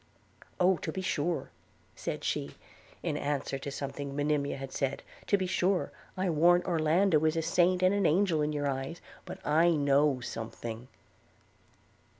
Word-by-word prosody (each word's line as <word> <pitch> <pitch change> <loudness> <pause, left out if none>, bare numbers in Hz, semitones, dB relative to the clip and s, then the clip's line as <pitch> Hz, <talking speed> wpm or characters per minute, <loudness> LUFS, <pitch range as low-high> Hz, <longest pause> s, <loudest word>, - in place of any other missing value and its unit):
'Oh! 180 0 +4
to 160 - -4
be 190 +3 -4
sure,' 170 -1 -1 0.4
said - - -4
she, 70 0 -2 0.5
in - - -1
answer 140 -1 -2
to 140 - -5
something 140 0 -5
Monimia 145 -1 0
had 135 -1 -7
said; 135 0 -2 0.2
'to 200 - +4
be 190 - -1
sure, 185 +1 +1 0.3
I 185 +1 0
warrant 175 +3 +4
Orlando 165 0 +3
is 160 +1 +2
a 165 - 0
saint 180 +2 +2
and 185 +1 +5
an 200 0 +2
angel 170 -1 +2
in 150 0 0
your 145 -1 -1
eyes 135 +5 -3
– - - -22
but - - -6
I 160 +3 +4
know 140 -1 +3
something.' 115 0 -6
150 Hz, 160 wpm, -30 LUFS, 140-175 Hz, 0.5 s, and